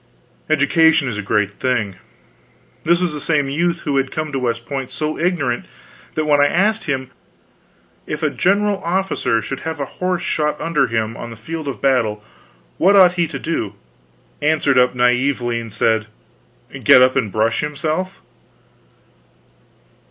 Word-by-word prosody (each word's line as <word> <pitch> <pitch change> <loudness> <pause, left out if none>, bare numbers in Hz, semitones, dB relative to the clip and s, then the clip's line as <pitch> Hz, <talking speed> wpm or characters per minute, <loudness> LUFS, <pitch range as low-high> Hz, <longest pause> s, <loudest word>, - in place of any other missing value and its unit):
Education 155 0 +4
is 110 -4 -3
a - - -1
great 100 0 -1
thing. 115 -7 -1 0.9
This 170 +1 +3
was 180 -3 -1
the 150 - -4
same 145 -4 +1
youth 170 +3 0
who 145 -3 -1
had 135 0 0
come 155 -1 -3
to 135 - -2
West 120 -2 -2
Point 135 -2 -4
so 155 0 -3
ignorant 155 -8 0 0.5
that 155 - 0
when 145 -1 +4
I 145 - +5
asked 210 +7 +1
him, 130 -3 -3 1.0
"If - - -4
a - - +2
general 200 +1 +1
officer 175 - 0
should 135 - -5
have 160 -1 -5
a 140 - -1 0.2
horse 180 -1 0
shot 150 -1 -1
under 150 -5 +1
him 115 -1 -2
on 120 - -7
the 115 - -9
field 155 +7 -6
of 140 - -5
battle, 115 -6 +1 0.6
what 195 +4 +5
ought 185 -3 +7
he 170 -2 0
to - - -6
do?" 110 -11 -3 0.7
answered 150 -3 +3
up 125 0 +3
naively 125 -1 +1
and 115 -1 -8
said: 110 0 +1 0.8
"Get 125 - +7
up 130 0 +3
and 120 -7 0
brush 110 +2 +1
himself." 155 +5 -3
140 Hz, 160 wpm, -19 LUFS, 120-165 Hz, 1.0 s, ought